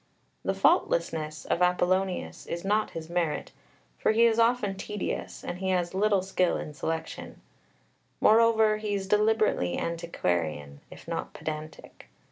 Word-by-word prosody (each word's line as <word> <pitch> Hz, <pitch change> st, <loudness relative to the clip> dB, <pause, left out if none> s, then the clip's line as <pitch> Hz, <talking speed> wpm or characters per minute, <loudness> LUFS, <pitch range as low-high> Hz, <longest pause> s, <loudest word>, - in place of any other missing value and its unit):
The -, -, -1 dB
"faultlessness" 155 Hz, -, +1 dB
of 175 Hz, -, -1 dB
Apollonius 180 Hz, +1 st, 0 dB
is 170 Hz, +2 st, -4 dB
not 210 Hz, +2 st, +1 dB
his 160 Hz, -1 st, -7 dB
merit, 170 Hz, -3 st, -2 dB, 0.5 s
for -, -, +2 dB
he 230 Hz, +2 st, +5 dB
is 230 Hz, 0 st, +3 dB
often 230 Hz, -4 st, +2 dB
tedious, 205 Hz, +1 st, -5 dB
and 175 Hz, +1 st, -5 dB
he 190 Hz, 0 st, -2 dB
has 180 Hz, -2 st, 0 dB
little 200 Hz, -1 st, +2 dB
skill 185 Hz, -2 st, +1 dB
in 150 Hz, -, -6 dB
selection; 160 Hz, +2 st, -5 dB, 0.8 s
moreover, 220 Hz, -1 st, +5 dB
he 210 Hz, -1 st, -2 dB
is 195 Hz, -1 st, -3 dB
deliberately 210 Hz, -, +2 dB
antiquarian, 85 Hz, -, -2 dB
if -, -, -13 dB
not -, -, -4 dB
pedantic. 155 Hz, 0 st, -8 dB
185 Hz, 135 wpm, -28 LUFS, 160-215 Hz, 0.8 s, he